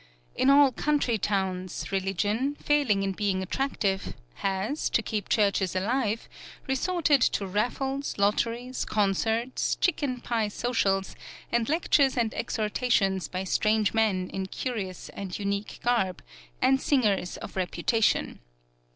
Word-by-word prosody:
In 265 Hz, -, +3 dB
all 280 Hz, -1 st, +7 dB
country 270 Hz, -5 st, 0 dB
towns, 185 Hz, -2 st, -2 dB
religion, 205 Hz, +8 st, 0 dB
failing 280 Hz, -11 st, +1 dB
in 195 Hz, -, 0 dB
being 190 Hz, -1 st, -1 dB
attractive, 200 Hz, -3 st, -1 dB, 0.2 s
has, 195 Hz, +9 st, -1 dB
to 230 Hz, -, +1 dB
keep 210 Hz, -3 st, -3 dB
churches 200 Hz, -4 st, +2 dB
alive, 225 Hz, +3 st, 0 dB, 0.4 s
resorted 290 Hz, +1 st, +2 dB
to 205 Hz, -, +2 dB
raffles, 265 Hz, +8 st, -2 dB
lotteries, 230 Hz, +5 st, 0 dB
concerts, 220 Hz, +4 st, 0 dB
chicken 285 Hz, -7 st, 0 dB
pie 230 Hz, -3 st, -1 dB
socials, 205 Hz, -3 st, 0 dB, 0.4 s
and 235 Hz, 0 st, +1 dB
lectures 290 Hz, -4 st, +3 dB
and 230 Hz, -2 st, +1 dB
exhortations 205 Hz, -, 0 dB
by 185 Hz, +4 st, -4 dB
strange 215 Hz, +2 st, +1 dB
men 205 Hz, -5 st, +1 dB
in 190 Hz, -1 st, -3 dB
curious 195 Hz, -5 st, -4 dB
and 190 Hz, -2 st, -6 dB
unique 200 Hz, 0 st, -3 dB
garb, 225 Hz, -7 st, +1 dB, 0.4 s
and 265 Hz, 0 st, +4 dB
singers 210 Hz, -10 st, +1 dB
of -, -, -9 dB
reputation. 190 Hz, +4 st, 0 dB
215 Hz, 120 wpm, -27 LUFS, 195-255 Hz, 0.4 s, all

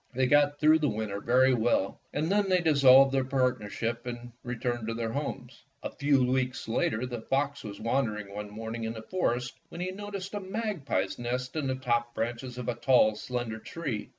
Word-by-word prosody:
They 130 Hz, 0 st, +3 dB
got 145 Hz, +2 st, +4 dB
through 155 Hz, +1 st, +5 dB
the 150 Hz, -2 st, +1 dB
winter 105 Hz, -2 st, -3 dB
very 130 Hz, +3 st, +4 dB
well, 115 Hz, -4 st, +1 dB
and 155 Hz, +4 st, -1 dB
then 205 Hz, -1 st, +2 dB
they 185 Hz, -1 st, +4 dB
dissolved 135 Hz, -5 st, +6 dB
their 135 Hz, -1 st, +2 dB
partnership 120 Hz, -3 st, -1 dB
and 120 Hz, 0 st, -6 dB
returned 120 Hz, -1 st, -3 dB
to 115 Hz, -, -2 dB
their 115 Hz, -1 st, -2 dB
homes. 145 Hz, +4 st, -5 dB, 0.2 s
A -, -, -4 dB
few 140 Hz, -2 st, +2 dB
weeks 130 Hz, -1 st, -1 dB
later 115 Hz, +1 st, 0 dB
the 120 Hz, -2 st, -5 dB
fox 140 Hz, +3 st, -1 dB
was 100 Hz, -2 st, -7 dB
wandering 110 Hz, -4 st, -1 dB
one 105 Hz, 0 st, -5 dB
morning 110 Hz, +2 st, -5 dB
in 110 Hz, -, -3 dB
the 110 Hz, -1 st, -8 dB
forest 125 Hz, -7 st, -1 dB, 0.2 s
when -, -, -9 dB
he 180 Hz, +1 st, -2 dB
noticed 200 Hz, -1 st, -6 dB
a 205 Hz, -, -2 dB
magpie's 190 Hz, -, -2 dB
nest 125 Hz, +2 st, -3 dB
in 150 Hz, -3 st, -1 dB
the 130 Hz, -, 0 dB
top 120 Hz, -2 st, -1 dB
branches 120 Hz, +2 st, -3 dB
of 125 Hz, -, -5 dB
a 125 Hz, -, +1 dB
tall, 120 Hz, -2 st, +4 dB
slender 120 Hz, -1 st, -4 dB
tree. 135 Hz, -4 st, -5 dB
125 Hz, 195 wpm, -29 LUFS, 115-145 Hz, 0.2 s, dissolved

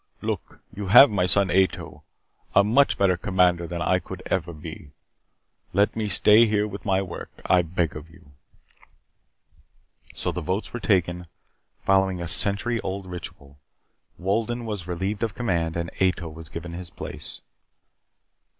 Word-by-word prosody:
Look, -, -, -4 dB
you 100 Hz, -1 st, -5 dB
have 130 Hz, +7 st, +9 dB
my 90 Hz, -3 st, +1 dB
son 95 Hz, 0 st, +3 dB
Ato. 95 Hz, -1 st, 0 dB, 0.5 s
A 100 Hz, -, +7 dB
much 125 Hz, +7 st, +3 dB
better 95 Hz, -2 st, +3 dB
commander 90 Hz, -2 st, +2 dB
than 85 Hz, +1 st, -3 dB
I 90 Hz, -, +2 dB
could 95 Hz, 0 st, -9 dB
ever 85 Hz, -2 st, -1 dB
be. 80 Hz, -2 st, -9 dB, 0.8 s
Let 100 Hz, +3 st, +2 dB
me 110 Hz, -2 st, -2 dB
stay 105 Hz, +4 st, +6 dB
here 105 Hz, 0 st, +1 dB
with 100 Hz, +2 st, -8 dB
my 95 Hz, -1 st, +2 dB
work, 90 Hz, -3 st, -7 dB, 0.2 s
I 90 Hz, -, +4 dB
beg 85 Hz, -1 st, -2 dB
of 75 Hz, +1 st, -9 dB
you." 80 Hz, -3 st, -19 dB, 1.8 s
So -, -, -2 dB
the -, -, -4 dB
votes 95 Hz, +4 st, -3 dB
were 120 Hz, -, -3 dB
taken, 90 Hz, -3 st, 0 dB, 0.6 s
following 95 Hz, -1 st, +2 dB
a 85 Hz, -, -4 dB
century 100 Hz, +7 st, +1 dB
old 95 Hz, +1 st, -4 dB
ritual. 75 Hz, -6 st, -9 dB, 0.6 s
Wolden 115 Hz, +5 st, -1 dB
was 105 Hz, -6 st, -5 dB
relieved 95 Hz, +4 st, -3 dB
of 115 Hz, -4 st, -2 dB
command 85 Hz, -9 st, -1 dB
and 85 Hz, 0 st, -3 dB
Ato 90 Hz, -3 st, +1 dB
was 80 Hz, 0 st, -10 dB
given 85 Hz, +1 st, -7 dB
his 90 Hz, 0 st, -6 dB
place. -, -, -7 dB
95 Hz, 150 wpm, -25 LUFS, 85-100 Hz, 1.8 s, have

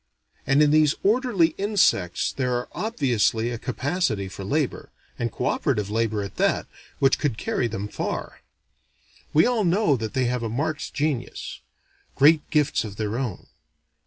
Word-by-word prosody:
And 135 Hz, +2 st, +5 dB
in 145 Hz, -, +4 dB
these 155 Hz, -1 st, +4 dB
orderly 210 Hz, -5 st, +3 dB
insects 195 Hz, -, +2 dB
there 125 Hz, -2 st, -1 dB
are 120 Hz, 0 st, -3 dB
obviously 120 Hz, -, 0 dB
a 120 Hz, -, -4 dB
capacity 130 Hz, -, -1 dB
for 95 Hz, +1 st, -8 dB
labor, 145 Hz, +7 st, -1 dB, 0.3 s
and 115 Hz, -1 st, -1 dB
co 125 Hz, -, -4 dB
operative 105 Hz, -9 st, 0 dB
labor 110 Hz, -2 st, 0 dB
at 100 Hz, -, -8 dB
that, -, -, +1 dB, 0.3 s
which 135 Hz, -1 st, +3 dB
could 140 Hz, -8 st, -1 dB
carry 120 Hz, -, -1 dB
them 105 Hz, -2 st, -4 dB
far. -, -, -5 dB, 0.9 s
We 155 Hz, -, +5 dB
all 240 Hz, -3 st, +1 dB
know 175 Hz, -4 st, +3 dB
that 110 Hz, -3 st, -5 dB
they 130 Hz, -1 st, +2 dB
have 125 Hz, 0 st, -1 dB
a 115 Hz, -, -2 dB
marked 145 Hz, +6 st, -3 dB
genius: 145 Hz, -4 st, -3 dB, 0.6 s
great 150 Hz, +2 st, +4 dB
gifts 150 Hz, -1 st, +2 dB
of 105 Hz, -3 st, -7 dB
their 105 Hz, 0 st, -2 dB
own. 120 Hz, -9 st, -4 dB
130 Hz, 160 wpm, -24 LUFS, 110-155 Hz, 0.9 s, And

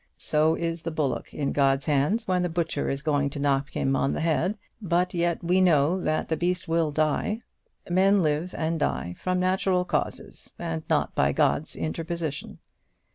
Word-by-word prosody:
"So 155 Hz, +1 st, +2 dB
is 165 Hz, 0 st, -3 dB
the 165 Hz, -, -3 dB
bullock 155 Hz, -5 st, -2 dB
in 140 Hz, -2 st, -2 dB
God's 135 Hz, -1 st, +2 dB
hands 150 Hz, +11 st, +1 dB
when 180 Hz, -1 st, +2 dB
the 180 Hz, -, 0 dB
butcher 165 Hz, -3 st, -1 dB
is 135 Hz, +1 st, -3 dB
going 145 Hz, -2 st, +1 dB
to 145 Hz, -, -6 dB
knock 140 Hz, 0 st, +1 dB
him 135 Hz, 0 st, 0 dB
on 135 Hz, -, +1 dB
the -, -, -2 dB
head, 170 Hz, +5 st, +1 dB, 0.2 s
but 180 Hz, -2 st, +1 dB
yet 170 Hz, -1 st, 0 dB
we 180 Hz, +2 st, +3 dB
know 170 Hz, 0 st, +3 dB
that 155 Hz, -2 st, 0 dB
the 160 Hz, -, 0 dB
beast 175 Hz, +1 st, -1 dB
will 165 Hz, -1 st, +1 dB
die. 155 Hz, +9 st, 0 dB, 0.5 s
Men 190 Hz, +2 st, +4 dB
live 155 Hz, +4 st, -1 dB
and 160 Hz, 0 st, -1 dB
die 90 Hz, -10 st, -1 dB
from 185 Hz, 0 st, 0 dB
natural 185 Hz, 0 st, +1 dB
causes, -, -, -4 dB
and 80 Hz, -1 st, -3 dB
not -, -, +1 dB
by -, -, +2 dB
God's 155 Hz, -, +1 dB
interposition." 165 Hz, -2 st, -4 dB
165 Hz, 180 wpm, -26 LUFS, 145-180 Hz, 0.5 s, Men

